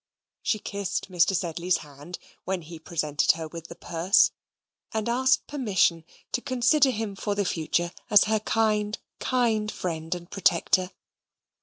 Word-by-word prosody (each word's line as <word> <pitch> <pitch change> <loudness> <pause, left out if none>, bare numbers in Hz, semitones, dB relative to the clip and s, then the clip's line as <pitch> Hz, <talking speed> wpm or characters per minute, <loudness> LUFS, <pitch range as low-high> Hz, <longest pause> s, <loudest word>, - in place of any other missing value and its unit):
She 215 - +1
kissed 200 -2 -4
Mr. 180 +2 +3
Sedley's 175 +1 0
hand, 145 +5 -10 0.3
when 185 -2 -2
he 165 +1 -10
presented 155 -2 +1
her 160 -1 -6
with 165 +1 -9
the 170 - -10
purse; 170 +4 +3 0.6
and 220 -1 -2
asked 260 +2 +2
permission 195 - +1 0.3
to 245 - -1
consider 260 +3 +3
him 220 -4 -3
for 205 +1 -2
the 200 -1 0
future 170 0 0 0.2
as 210 - +7
her 220 +1 +1
kind, 210 -1 +1 0.2
kind 225 -4 +1
friend 165 -1 -3
and 175 -1 -9
protector. 185 -1 +2
190 Hz, 145 wpm, -26 LUFS, 170-220 Hz, 0.6 s, as